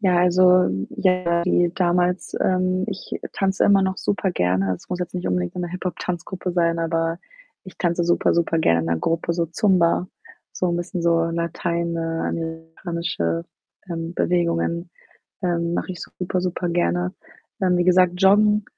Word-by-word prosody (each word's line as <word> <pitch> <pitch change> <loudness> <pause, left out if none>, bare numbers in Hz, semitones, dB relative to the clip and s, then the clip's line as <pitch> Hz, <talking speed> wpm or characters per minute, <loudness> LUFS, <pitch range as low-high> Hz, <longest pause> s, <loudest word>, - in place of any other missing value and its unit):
Ja, 185 -4 +3
also, 180 +1 +5 0.2
ja, 180 -2 +1
wie 175 -1 +2
damals, 180 0 0
ähm, 185 0 +1
ich 195 -3 -6 0.2
tanze 195 -1 +1
immer 200 -1 +5
noch 190 0 0
super 200 -1 -1
gerne. 95 - +1
Es - - -14
muss 180 0 -3
jetzt 180 +1 -4
nicht 180 - -3
unbedingt 90 -1 -1
so - - -6
'ne 175 -1 -2
Hip-Hop-Tanzgruppe 180 0 -4
sein, 170 -1 +1
aber 165 0 -1 0.5
ich 185 - -12
tanze 175 -1 +1
super, 170 0 +2
super 165 -1 +1
gerne 85 - +3
in 80 - -3
'ner 85 0 +1
Gruppe, 165 - -1
so 170 0 0
Zumba, 180 0 +2 0.5
so 180 - -1
'n 170 - 0
bisschen 175 0 -4
so 165 -1 +3
lateinamerikanische, 165 - -2 0.5
ähm, 165 0 -4
Bewegungen, 170 0 0 0.5
ähm, 170 -1 0
mache 185 - -2
ich 175 - -10
super, 180 0 -3
super 180 0 -2
gerne. 90 - 0 0.5
Ähm, 180 -1 +2
wie 175 - +2
gesagt, 180 -1 +5
Joggen, 210 +3 +4
175 Hz, 155 wpm, -22 LUFS, 165-185 Hz, 0.5 s, also